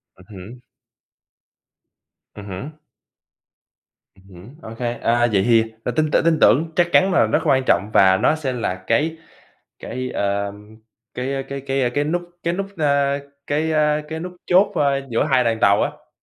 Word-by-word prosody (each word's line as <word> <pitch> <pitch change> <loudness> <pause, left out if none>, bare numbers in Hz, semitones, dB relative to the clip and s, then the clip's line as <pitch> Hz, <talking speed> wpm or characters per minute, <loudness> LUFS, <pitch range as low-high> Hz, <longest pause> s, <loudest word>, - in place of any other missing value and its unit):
Ừm 95 - -19
hứm. 105 +5 -11 1.8
Ừm 105 - -10
hứm. 135 +12 -8 1.4
Ừm 95 - -23
hứm. 95 +10 -14
Ô - - -10
kê, 120 -1 -1
à, 120 0 +1
vậy 95 -1 +3
thì, 115 -2 +5 0.2
à, - - -2
tin 155 -1 +1
tưởng - - +2
tin 165 -1 +3
tưởng 160 +4 +4
chắc 175 -1 +3
chắn 190 +1 +4
là 140 - +4
rất 110 - +1
quan 130 -1 +3
trọng 100 - +2
và 95 -1 +5
nó 155 - +2
sẽ 140 -5 -3
là 115 -6 -2
cái 160 +7 +1 0.6
cái, 130 +2 -5
ờ, 100 0 -2 0.6
cái 135 +2 -3
cái 140 0 -5
cái 135 -2 -1
cái 145 +3 -1
nút 175 +3 -1 0.2
cái 170 - -1
nút, 195 +1 -3
ơ, 140 -2 +1 0.3
cái, 155 +2 -1
a, 150 -1 +2
cái 160 0 -5
nút 180 +1 -6
chốt, 185 +3 +3
a, 140 -4 +2
giữa 115 - +1
2 130 -2 +3
đoàn 115 -1 0
tàu 100 +1 +4
á. - - -5
135 Hz, 175 wpm, -21 LUFS, 115-155 Hz, 1.8 s, thì